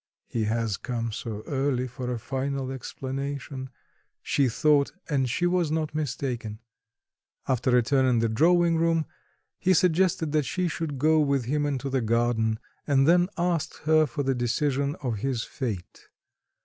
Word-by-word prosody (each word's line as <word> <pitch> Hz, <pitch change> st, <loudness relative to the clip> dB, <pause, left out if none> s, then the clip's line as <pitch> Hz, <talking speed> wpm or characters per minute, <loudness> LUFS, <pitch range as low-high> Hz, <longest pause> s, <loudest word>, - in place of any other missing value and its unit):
"He 110 Hz, -2 st, -2 dB
has 110 Hz, -2 st, 0 dB
come 115 Hz, -2 st, -3 dB
so 110 Hz, -1 st, -5 dB
early 135 Hz, -2 st, 0 dB
for 125 Hz, 0 st, -5 dB
a 120 Hz, -, -1 dB
final 135 Hz, +2 st, -3 dB
explanation," 135 Hz, +1 st, -5 dB, 0.5 s
she 140 Hz, -3 st, +2 dB
thought, 145 Hz, +3 st, +3 dB, 0.2 s
and 135 Hz, -4 st, +1 dB
she 175 Hz, +9 st, 0 dB
was 175 Hz, -2 st, +2 dB
not 155 Hz, -1 st, -1 dB
mistaken. 125 Hz, -7 st, -3 dB, 0.9 s
After 130 Hz, -1 st, +2 dB
a 120 Hz, -, +4 dB
turn 130 Hz, +2 st, +2 dB
in 125 Hz, -2 st, +3 dB
the 115 Hz, 0 st, +2 dB
drawing 170 Hz, +8 st, +3 dB
room, 165 Hz, -1 st, +2 dB, 0.5 s
he 185 Hz, 0 st, +3 dB
suggested 170 Hz, -2 st, +2 dB
that 155 Hz, 0 st, +3 dB
she 180 Hz, +8 st, -1 dB
should 155 Hz, -3 st, -3 dB
go 155 Hz, +3 st, +4 dB
with 140 Hz, -4 st, +1 dB
him 145 Hz, +3 st, 0 dB
into 140 Hz, -2 st, -2 dB
the 135 Hz, -1 st, 0 dB
garden, 115 Hz, -1 st, +1 dB, 0.3 s
and 135 Hz, -1 st, +4 dB
then 175 Hz, +2 st, +5 dB
asked 170 Hz, -3 st, -1 dB
her 155 Hz, 0 st, +4 dB
for 145 Hz, +3 st, -3 dB
the 135 Hz, 0 st, +1 dB
decision 135 Hz, +3 st, 0 dB
of 120 Hz, -4 st, -1 dB
his 125 Hz, +1 st, -1 dB
fate. 110 Hz, -10 st, -6 dB
135 Hz, 160 wpm, -26 LUFS, 120-155 Hz, 0.9 s, then